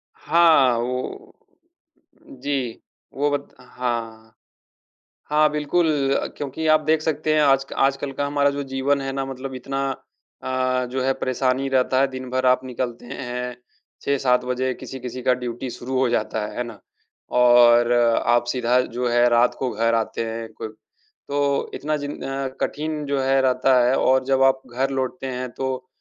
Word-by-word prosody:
हाँ, 155 -7 +4
वो 130 - -4 1.1
जी, 135 -5 -2 0.3
वो 145 +2 +1
वत 145 0 -2
हाँ। 115 -3 -5 1.0
हाँ, 150 0 +4
बिल्कुल 150 +3 +1 0.5
क्योंकि 145 +3 -3
आप 155 0 +5
देख 155 0 +2
सकते 155 0 0
हैं 155 - +4
आज 135 -2 +4
क - - -6
आजकल 135 +1 +1
का 145 - -2
हमारा 145 0 +2
जो 140 0 -3
जीवन 135 +1 0
है 135 0 -3
ना 135 0 -2
मतलब 135 0 -6
इतना 135 +2 -4 0.6
अ, 130 -1 0
जो 130 - -1
है 135 0 +2
परेशानी 130 +1 -1
रहता 130 0 +2
है। 140 - +3
दिन 130 -1 -7
भर 130 0 -1
आप 125 +1 +3
निकलते 120 -1 -4
हैं, 125 -1 -5 0.5
6-7 125 -3 +1
बजे 130 +1 -1
किसी-किसी 130 -1 -7
का 125 - +3
ड्यूटी 125 0 -5
शुरू 130 +2 -4
हो 130 - +3
जाता 110 -2 -1
है, - - -8
है 125 - 0
ना? 120 - -10 0.5
और 120 -1 +5 0.3
आप 120 0 +3
सीधा 125 0 +2
जो 125 0 -3
है 120 0 +4
रात 120 +1 +3
को 130 - -1
घर 115 +2 +1
आते 115 0 -1
हैं, 115 0 -5
कोब 110 -1 -7 0.5
तो 140 -1 0
इतना 150 +1 -2
जिन 145 0 -6
अ, 135 0 -3
कठिन 155 0 -2
जो 140 -1 -1
है 135 0 +3
रहता 130 0 +3
है 130 - +3
और 130 0 +3
जब 135 0 +2
आप 135 0 +3
घर 135 +2 0
लौटते 130 0 -3
हैं, 130 0 -4
तो 130 0 -4
130 Hz, 170 wpm, -22 LUFS, 125-140 Hz, 1.1 s, आप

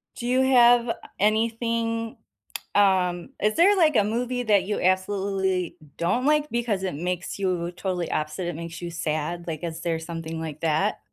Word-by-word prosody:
Do 240 - -6
you 255 +1 +3
have, 245 -2 +5
uh, - - +2 0.3
anything, 230 +1 0 0.6
um, 185 -3 +2
is 215 0 +2
there 390 +5 +5
like 315 -7 +3
a 205 - +5
movie 245 +3 -1
that 205 -4 +3
you 205 +2 -2
absolutely 190 -1 0 0.2
don't 220 +10 0
like 300 0 +2
because 230 -5 -1
it 185 -6 -2
makes 175 +3 -3
you 180 -3 -1
totally 180 -2 -3
opposite, 155 +4 -2
it 175 - -3
makes 170 +1 -7
you 175 - -5
sad, 165 +1 -3
like 160 -1 -5
is 165 -1 -4
there 165 -2 -1
something 165 -1 -6
like 155 -2 -6
that? 160 -1 +1
190 Hz, 175 wpm, -25 LUFS, 170-230 Hz, 0.6 s, have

